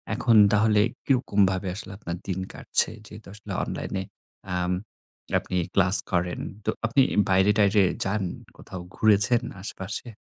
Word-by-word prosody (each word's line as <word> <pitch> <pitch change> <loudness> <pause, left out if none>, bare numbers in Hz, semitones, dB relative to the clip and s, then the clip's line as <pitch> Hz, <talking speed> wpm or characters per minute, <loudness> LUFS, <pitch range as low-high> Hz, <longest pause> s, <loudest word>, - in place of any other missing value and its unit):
এখন 115 - +2 0.2
তাহলে 105 0 +3 0.3
কিরকমভাবে, 100 -7 +1
আসলে 105 - -7
আপনার 85 -4 -6
দিন 95 -1 -2
কাটছে? - - +1 0.2
যেহেতু 105 0 -12
আসলে 105 -1 -10
অনলাইনে 95 - -4 0.5
আম 90 0 -1 0.7
আপনি 90 - -4 0.2
ক্লাস 90 +3 +3 0.2
করেন। 90 -1 -1 0.3
তো - - 0 0.2
আপনি 130 +4 +2 0.3
বাইরে-টাইরে 100 +2 +3 0.2
যান, 95 +1 -1 0.3
কোথাও 95 -2 -9
ঘুরেছেন 110 +3 +4 0.2
আশেপাশে? 100 +3 -6
100 Hz, 125 wpm, -25 LUFS, 95-110 Hz, 0.7 s, ঘুরেছেন